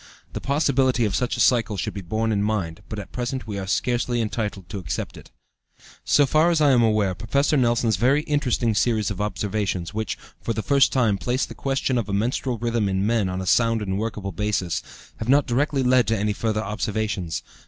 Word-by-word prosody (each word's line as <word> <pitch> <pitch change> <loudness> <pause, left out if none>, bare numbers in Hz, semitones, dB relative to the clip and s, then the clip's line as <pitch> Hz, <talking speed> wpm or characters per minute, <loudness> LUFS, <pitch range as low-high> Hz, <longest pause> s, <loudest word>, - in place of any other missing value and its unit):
The - - -4
possibility 135 -4 +2
of 100 -4 -1
such 125 -1 -1
a - - -5
cycle 115 -4 +3
should 105 +2 -3
be 100 - -5
borne 110 +5 -1
in 100 -2 +1
mind, 100 -6 -2
but 110 - -5
at 100 -3 -7
present 125 +1 -3
we 105 -3 -4
are 95 - -5
scarcely 120 +3 0
entitled 105 -4 -3
to 100 - -5
accept 80 -6 -4
it. - - -13 0.7
So 145 - +4
far 155 +5 +3
as 170 -2 +2
I 145 -2 +5
am 125 -2 +4
aware, 105 -4 +2
Professor 140 +9 0
Nelson's 120 -5 +2
very 135 +8 +3
interesting 130 -6 0
series 110 -1 +1
of 100 - -4
observations, 100 -3 -2
which, 110 -1 -3 0.2
for 115 - -2
the 110 - -3
first 140 -1 +4
time, 115 -7 +2
placed 125 +2 -1
the - - -7
question 135 -2 -1
of 105 -3 -4
a - - -2
menstrual 120 +4 -1
rhythm 115 -2 0
in 95 +1 0
men 110 -3 +1
on 90 +1 -3
a - - -5
sound 115 +3 +2
and 95 0 -2
workable 105 -3 -3
basis, 100 -3 -1 0.4
have 110 - -5
not 140 +2 +5
directly 135 +2 0
led 125 -1 +4
to 115 - +1
any 105 +1 0
further 110 0 -1
observations. 105 -4 -2
110 Hz, 210 wpm, -23 LUFS, 100-125 Hz, 0.7 s, I